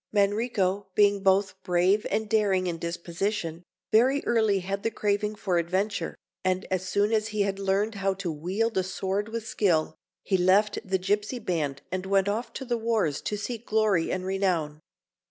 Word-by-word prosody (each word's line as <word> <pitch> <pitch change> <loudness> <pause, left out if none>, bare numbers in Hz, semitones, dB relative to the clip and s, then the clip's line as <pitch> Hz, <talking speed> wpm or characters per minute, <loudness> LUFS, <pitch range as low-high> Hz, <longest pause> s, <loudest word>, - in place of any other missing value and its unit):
Manrico, 205 -2 +1
being 205 -1 +4
both 190 -1 +2
brave 185 +3 +2
and 220 0 -1
daring 200 -4 +2
in 170 -2 -2
disposition, 170 +1 -3 0.3
very 255 +6 +4
early 220 -4 +2
had 195 +2 -3
the 225 - 0
craving 210 -1 -1
for 185 -4 0
adventure, 190 +5 -1 0.3
and 185 0 0
as 185 0 -1
soon 205 +3 +2
as 215 -1 +2
he 210 -1 -2
had 200 -1 0
learned 200 +3 +1
how 195 -1 -1
to 190 -3 -3
wield 190 +8 -1
a - - +1
sword 195 +3 -2
with 225 0 -4
skill, 170 -9 +1 0.3
he 190 - +1
left 190 +4 +3
the 190 0 0
gipsy 205 +6 -1
band 160 - -2
and 185 +1 -3
went 195 0 +3
off 230 +3 -2
to 265 - -6
the 240 -1 -1
wars 220 -11 0
to 210 - -3
seek 230 +2 -5
glory 215 -6 +2
and 185 0 -2
renown. 180 -6 0
195 Hz, 175 wpm, -27 LUFS, 185-215 Hz, 0.3 s, being